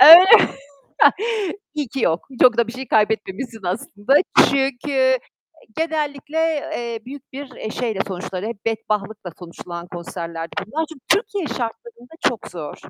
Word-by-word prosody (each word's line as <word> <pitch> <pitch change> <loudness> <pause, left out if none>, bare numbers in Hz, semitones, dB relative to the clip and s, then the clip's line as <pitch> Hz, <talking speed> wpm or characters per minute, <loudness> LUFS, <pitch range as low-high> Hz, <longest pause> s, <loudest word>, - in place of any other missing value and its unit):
Öy 350 +5 +11 1.3
İyi 295 -5 -2
ki 270 - -4
yok. 165 +8 0
Çok 245 -2 +7
da 235 -1 +3
bir 230 - -6
şey 260 +1 -7
kaybetmemişsin 220 +2 0
aslında. 205 +7 -1 0.4
Çünkü 265 -1 +1 0.6
genellikle, 305 -2 -2 0.3
eee, 235 -1 -4
büyük 275 0 -10
bir, 275 +1 -7
eee, 215 - -5
şeyle 225 -5 -2
sonuçları 185 +1 -5
hep 225 -3 -7
bedbahtlıkla 215 -3 -2
sonuçlanan 170 0 -8
konserlerdi 165 -1 -6 0.2
bunlar. 315 +8 -2
Çünkü 270 -5 -16
Türkiye 400 -1 +1
şartlarında 245 - -6
çok 235 - -6
zor. 155 -5 -7
235 Hz, 130 wpm, -21 LUFS, 200-280 Hz, 1.3 s, Öy